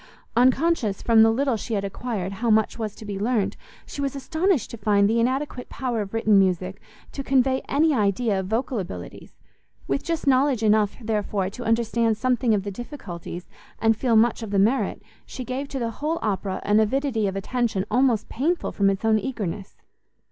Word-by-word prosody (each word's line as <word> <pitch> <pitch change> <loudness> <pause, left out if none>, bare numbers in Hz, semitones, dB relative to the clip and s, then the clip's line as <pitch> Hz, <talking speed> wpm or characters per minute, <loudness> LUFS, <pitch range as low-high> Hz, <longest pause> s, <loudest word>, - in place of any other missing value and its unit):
Unconscious 255 - +2
from 225 -2 +5
the 225 - +7
little 260 +2 +1
she 225 +1 -3
had 200 - -1
acquired 200 -2 -4
how 230 +4 -2
much 220 +1 +2
was 215 -2 -3
to 220 - -11
be 200 -2 -4
learnt, 220 -1 0 0.3
she 285 - -6
was 275 -1 -2
astonished 315 - 0
to - - -5
find 200 -1 +3
the 225 +2 +2
inadequate 255 +1 -1
power 245 -4 -2
of 200 -1 -6
written 220 -3 +3
music 185 0 0 0.3
to 275 - -5
convey 265 -1 +2
any 310 +2 +3
idea 210 -2 +1
of 190 - -4
vocal 230 +3 -1
abilities: 90 - -8 0.5
with 140 - -1
just 330 -1 -2
knowledge 265 -3 +3
enough, 210 -1 +3
therefore, 210 -4 -2
to 245 - -8
understand 225 0 +1
something 245 -1 +2
of 195 - -1
the 200 - -4
difficulties, 190 - -8 0.3
and 225 0 +3
feel 235 +1 +1
much 230 +2 +3
of 220 - -5
the 200 - 0
merit, 220 +7 +1 0.2
she 255 - -7
gave 260 +3 -3
to 275 - -5
the 230 -3 -2
whole 305 +8 -2
Opera 195 -2 -2
an 210 +1 +3
avidity 225 -1 +1
of 195 - -3
attention 205 -1 -1
almost 245 -2 +2
painful 325 +9 -1
from 200 -1 +2
its 195 +2 -2
own 220 -1 +4
eagerness. 205 -6 -5
225 Hz, 190 wpm, -24 LUFS, 200-255 Hz, 0.5 s, the